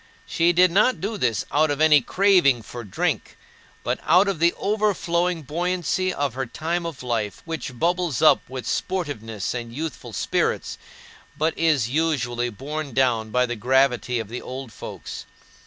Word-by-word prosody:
She 170 +1 +2
did 180 +1 +4
not 215 +8 +3
do 215 +3 -3
this 120 - 0
out 155 +1 +3
of 145 0 -1
any 155 -2 +6
craving 175 - +3
for 120 +3 -8
drink, 100 - -2 0.5
but - - -1
out 180 +5 +4
of 195 -5 -1
the 170 +1 +4
overflowing 180 -5 0
buoyancy 180 +4 -1
of 140 -7 -2
her 130 0 -3
time 170 +7 -2
of 155 -6 -8
life, 115 -4 -2
which 160 -6 -5
bubbles 175 -1 0
up 155 - +6
with 130 -1 -6
sportiveness 115 - -3
and 120 -2 -5
youthful 150 0 -6
spirits, - - -1 0.6
but 160 +2 0
is 155 -8 +2
usually 125 -5 0
borne 140 +5 -6
down 120 -4 +2
by 125 +3 +2
the 120 -1 -3
gravity 125 +1 +2
of 110 -3 -3
the 120 +4 -6
old 130 -3 -7
folks. - - -8
145 Hz, 160 wpm, -23 LUFS, 120-170 Hz, 0.6 s, any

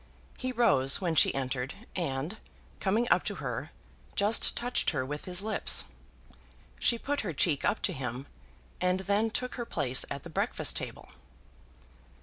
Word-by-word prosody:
He 255 0 -2
rose 140 - +3
when 175 -4 0
she 160 - +6
entered, 130 0 -2 0.2
and, 160 +3 -2 0.4
coming 215 +5 +1
up - - +5
to - - -2
her, - - -4 0.5
just 210 +3 +4
touched 245 +1 +1
her 130 - -1
with 145 +2 -5
his 180 +1 -1
lips. 215 0 +2 0.9
She 235 - +3
put 285 +4 -1
her 185 -6 -3
cheek 145 -1 +1
up 220 - +1
to 190 - +2
him, 130 -2 -4 0.6
and 180 +1 +2
then 205 +3 +2
took 250 +2 -2
her - - 0
place 135 - +1
at 140 -1 -5
the 170 - -8
breakfast - - +1
table. - - -5
180 Hz, 155 wpm, -30 LUFS, 135-220 Hz, 0.9 s, she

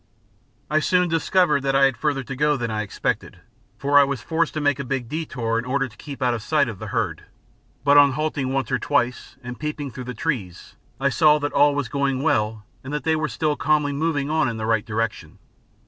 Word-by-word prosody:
I 155 +2 +2
soon 180 +2 +2
discovered 165 -2 +2
that 135 0 0
I 135 - +4
had 135 -2 +2
further 140 +1 -1
to 130 +1 -6
go 150 +2 +2
than 120 -3 -3
I 110 -1 -1
expected, 105 - -3 0.4
for 145 +1 +4
I - - +7
was 140 -2 -2
forced 160 +6 -1
to - - -1
make 145 -2 +1
a - - -2
big 125 -2 -3
detour 120 -7 -2
in 120 - -5
order 135 +1 0
to 110 - -17
keep 140 -2 -7
out 125 -1 +2
of 115 - -3
sight 145 +3 +2
of 110 -5 -6
the - - -6
herd; - - -2 0.6
but 145 0 +5
on 140 -2 +5
halting 145 -2 -2
once 135 -3 -1
or - - +1
twice 125 -4 -1
and 125 0 -7
peeping 150 -2 -4
through 125 +2 -8
the 125 0 -6
trees 110 - -4 0.2
I 140 +1 +2
saw 150 +1 +4
that 145 0 -3
all 145 0 +4
was 145 -3 -1
going 140 0 -1
well 110 -8 0 0.2
and 130 - -7
that 150 0 -3
they 160 -1 +2
were 155 -1 -1
still 155 -2 -1
calmly 150 -1 +1
moving 145 -1 -1
on 155 -4 +1
in 115 - -5
the 110 - -3
right 110 -2 0
direction. 115 0 -3
140 Hz, 230 wpm, -23 LUFS, 125-150 Hz, 0.6 s, I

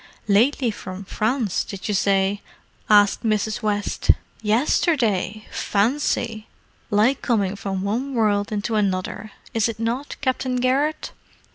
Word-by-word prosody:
"Lately 235 +4 +3
from 185 -1 -8
France, 220 0 0
did 195 -2 -7
you 210 - 0
say?" 195 0 +2 0.5
asked 205 -1 +5
Mrs. 215 +1 0
West. 205 -2 -2 0.3
"Yesterday! 220 - +1
Fancy! 225 0 0 0.4
Like 220 +6 +3
coming 205 -5 0
from 195 -1 -4
one 250 +7 -2
world 205 -3 +1
into 215 +2 -2
another, 200 +1 -1 0.2
is 225 0 +2
it 220 - -6
not, 240 +5 -2
Captain 260 -2 -1
Garrett? 275 +5 0
215 Hz, 120 wpm, -22 LUFS, 205-245 Hz, 0.5 s, asked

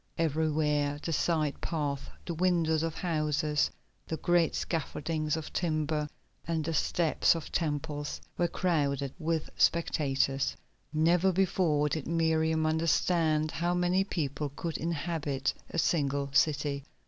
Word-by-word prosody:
Everywhere 150 -2 +1
the 165 - -2
side 155 -2 0
paths, 145 -4 -2 0.2
the 170 - -3
windows 165 -2 +2
of 165 -1 -2
houses, 155 -3 0 0.4
the 160 - -3
great 175 -1 +2
scaffoldings 155 -1 -2
of 160 - -7
timber, 155 -3 0 0.4
and 160 -2 -1
the 165 - -1
steps 165 +2 +2
of 165 - -6
temples 145 -2 -2 0.2
were 175 - +1
crowded 140 -7 0
with 160 -1 -1
spectators. 135 -4 +1 0.3
Never 170 +4 +3
before 175 -5 +2
did 150 -1 -3
Miriam 160 -1 +2
understand 160 -1 +2
how 175 +5 0
many 180 +2 +2
people 150 -5 -2
could 165 -1 -3
inhabit 155 -4 -1 0.2
a - - -5
single 140 -4 +1
city. 145 -1 +2
155 Hz, 125 wpm, -30 LUFS, 150-165 Hz, 0.4 s, Never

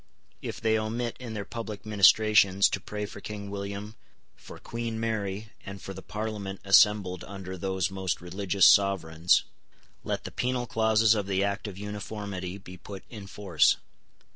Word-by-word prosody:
If - - -5
they 110 0 +2
omit, 115 +2 -2
in 120 -3 -6
their 100 -1 -4
public 110 -3 -6
ministrations, 105 -1 +5
to 100 - -2
pray 105 +2 -5
for 100 - -10
King 100 -1 -6
William, 100 +2 -5 0.4
for - - -12
Queen 115 -1 -4
Mary, 105 -2 -2
and 100 0 -8
for 95 - -7
the 95 - -9
Parliament 105 -2 -5
assembled 100 -2 +4
under 95 -2 -7
those 95 0 -1
most 95 -1 -2
religious 95 +2 +1
sovereigns, 90 -4 +4 0.6
let - - -2
the - - -7
penal 125 0 -1
clauses 110 -1 +3
of 105 -3 -2
the 95 0 +1
Act 100 +2 -2
of 95 -3 -7
Uniformity 100 -2 -5
be 95 -2 -11
put 100 0 -9
in 105 -4 -8
force. 95 -5 +2
100 Hz, 160 wpm, -28 LUFS, 95-110 Hz, 0.6 s, ministrations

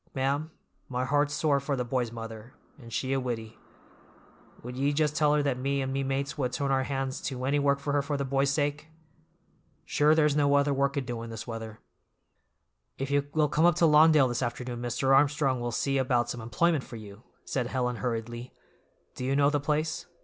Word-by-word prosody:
Ma'am, 140 +4 0 0.4
my 125 0 -1
heart's 145 +2 +1
sore 145 -3 +2
for 140 +1 -2
the 125 -2 -2
boy's 120 -1 -1
mother, 115 0 -8 0.2
and 115 -3 -12
she 130 +3 -1
a 135 - +1
widdy. 115 -4 -5 1.0
Would 125 +1 -7
ye 140 +3 +1
just 150 0 +1
tell 150 -1 +3
her 150 - +2
that 135 -3 -1
me 140 +2 0
and 135 0 -2
me 135 - 0
mates 135 +2 -2
would 125 -2 -1
turn 140 +1 -1
our 130 -1 +2
hands 135 -1 -3
to 130 -2 -4
any 145 +2 +2
work 140 0 +2
for 140 +1 -3
her 145 - +3
for 140 +1 -2
the 140 - -2
boy's 135 +1 +1
sake? 145 +1 -1 1.0
Sure 150 +1 +3
there's 150 -2 +3
no 145 -1 +3
other 140 0 +3
work 140 +1 0
a - - +2
doin' 120 -3 -5
this 110 -1 -7
weather." 115 -2 -7 1.2
"If 135 +1 -4
you 140 0 +1
will 155 -1 +4
come 155 +3 +2
up 175 -1 +5
to 175 - +3
Lawndale 155 -2 +6
this 120 0 -2
afternoon 120 0 -4
Mr. 120 +3 +2
Armstrong 140 -2 +2
will 120 0 -3
see 135 +3 0
about 120 -2 +1
some 120 - -6
employment 155 +6 +1
for 120 - -10
you," 105 -1 -10 0.2
said 125 -3 -2
Helen 125 -1 -1
hurriedly. 120 0 -4 0.6
"Do - - -7
you 135 +2 0
know 140 0 +4
the 145 - +1
place? 155 +2 -1
135 Hz, 210 wpm, -28 LUFS, 125-145 Hz, 1.2 s, Lawndale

